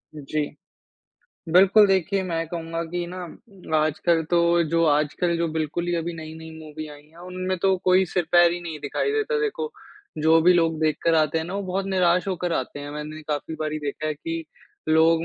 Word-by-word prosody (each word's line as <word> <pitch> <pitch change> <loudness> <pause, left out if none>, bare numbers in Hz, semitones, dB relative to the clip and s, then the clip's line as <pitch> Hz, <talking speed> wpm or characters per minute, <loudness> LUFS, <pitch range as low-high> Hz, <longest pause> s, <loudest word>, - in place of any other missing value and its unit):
जी। 150 +1 -3 1.1
बिल्कुल 195 +4 +7
देखिए 195 0 +1
मैं 165 -3 -2
कहूँगा 165 0 -4
कि 175 +1 -4
ना 180 +1 -7 0.6
आजकल 160 +2 +1
तो 175 - +4 0.3
जो 165 +1 +2
आजकल 150 +3 +1
जो 170 - +1
बिल्कुल 160 +2 -2
ही 175 - +1
अभी 170 +1 -2
नई-नई 160 0 -9
मूवी 155 0 -8
आई 145 -1 -12
हैं, 160 - -23
उनमें 185 +1 -3
तो 190 -1 +4
कोई 185 +1 +5
सिर-पैर 175 0 +3
ही 175 - -4
नहीं 165 -3 -6
दिखाई 145 - -1
देता 440 +1 0
देखो 440 +1 -2 0.5
जो 160 +1 +5
भी 180 - +6
लोग 165 -2 +2
देखकर 155 +1 +1
आते 155 0 +2
हैं 160 - -3
ना 180 +4 -6
वो 200 - -2
बहुत 190 +1 -2
निराश 180 -1 +2
होकर 180 -2 -2
आते 145 -1 -3
हैं। 145 0 -7
मैंने 150 +1 -7
काफ़ी 150 +2 -3
बारी 155 0 -2
देखा 150 +1 -4
है 155 - -1
कि 165 +2 -5 0.4
लोग 160 +1 +4
165 Hz, 190 wpm, -24 LUFS, 155-180 Hz, 1.1 s, बिल्कुल